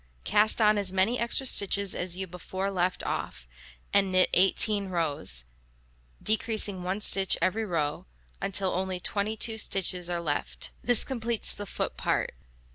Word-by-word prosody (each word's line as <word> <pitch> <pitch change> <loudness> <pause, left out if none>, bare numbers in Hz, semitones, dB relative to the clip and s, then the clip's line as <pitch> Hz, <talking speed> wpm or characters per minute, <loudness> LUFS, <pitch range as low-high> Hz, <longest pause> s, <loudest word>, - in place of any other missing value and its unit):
Cast 215 - +2
on 210 -1 +3
as 195 -2 +1
many 195 +6 +1
extra 235 +3 -1
stitches 200 -4 +3
as 180 0 -2
you 190 - -3
before 185 +2 -5
let 180 -1 -2
off, - - -5 0.5
and 195 -1 +2
knit 185 0 +3
18 200 +2 +4
rows, 145 - -2 0.8
decreasing 215 -3 0
1 185 +3 -4
stitch 195 -2 +4
every 220 +4 -1
row, 150 - -3 0.3
until 195 -1 +1
only 185 0 -3
22 215 +4 -1
stitches 180 -4 +1
are 175 -1 -2
left. 150 -4 -4
This 245 -2 +4
completes 235 -3 -1
the 205 - -8
foot - - -4
part. - - -2
190 Hz, 145 wpm, -27 LUFS, 180-215 Hz, 0.8 s, 18